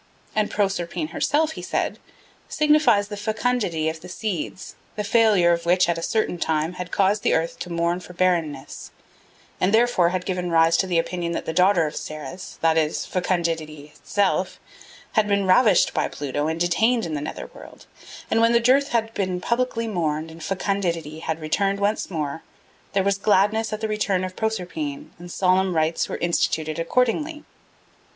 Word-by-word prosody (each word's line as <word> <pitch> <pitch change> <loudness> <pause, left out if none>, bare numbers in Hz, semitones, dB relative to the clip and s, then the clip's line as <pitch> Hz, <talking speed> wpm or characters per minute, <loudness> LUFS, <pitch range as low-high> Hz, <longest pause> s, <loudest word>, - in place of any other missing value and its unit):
And 215 -1 +1
Proserpine 195 - -1
herself 310 +1 +1
he - - -7
said, - - -2 0.5
signifies 300 -10 +3
the 210 - -5
fecundity 210 -6 -1
of 160 0 -3
the 180 - -10
seeds, 185 -2 -4 0.2
the 210 - -2
failure 205 -5 +4
of 170 0 -1
which 180 +1 +4
at 170 -1 0
a - - -6
certain 195 -2 -1
time 160 +1 0
had 180 0 -6
caused 200 +1 +2
the - - +2
earth 165 +1 -2
to 180 - -6
mourn 170 +1 0
for 180 0 -12
barrenness, 170 -6 -1 0.7
and 185 - +2
therefore 220 -6 +3
had 180 0 -3
given 180 -2 -2
rise 165 0 +4
to 190 - +1
the 175 -2 +1
opinion 170 0 -1
that - - -4
the 160 - -3
daughter 180 -1 +4
of 150 - -5
Ceres, 155 +3 -7
that 160 0 +3
is, 155 0 -1
fecundity 165 -5 -2
itself, 195 -2 -1 0.5
had 215 -2 +2
been 200 -1 +1
ravished 195 0 +4
by - - 0
Pluto 145 +1 -3
and 160 +1 -2
detained 220 +6 +2
in 160 - -4
the 145 - -2
nether 150 - -5
world; - - -13 0.5
and 225 - +3
when 230 +1 +4
the 235 - +5
dearth 260 +4 +3
had 225 -1 0
been 185 -3 -2
publicly 235 +2 -1
mourned 160 -5 -2
and 165 0 -11
fecundity 170 -4 -2
had 160 0 -3
returned 195 +6 0
once 205 +2 0
more, 155 -3 -3 0.5
there 195 - +2
was 200 0 +1
gladness 210 +2 +2
at 215 0 -4
the 220 - 0
return 210 -3 0
of 185 0 -5
Proserpine 280 - -3
and 175 0 -9
solemn 185 0 +2
rites 160 +1 +1
were - - -3
instituted 160 -2 0
accordingly. 250 - 0
185 Hz, 175 wpm, -23 LUFS, 165-215 Hz, 0.7 s, the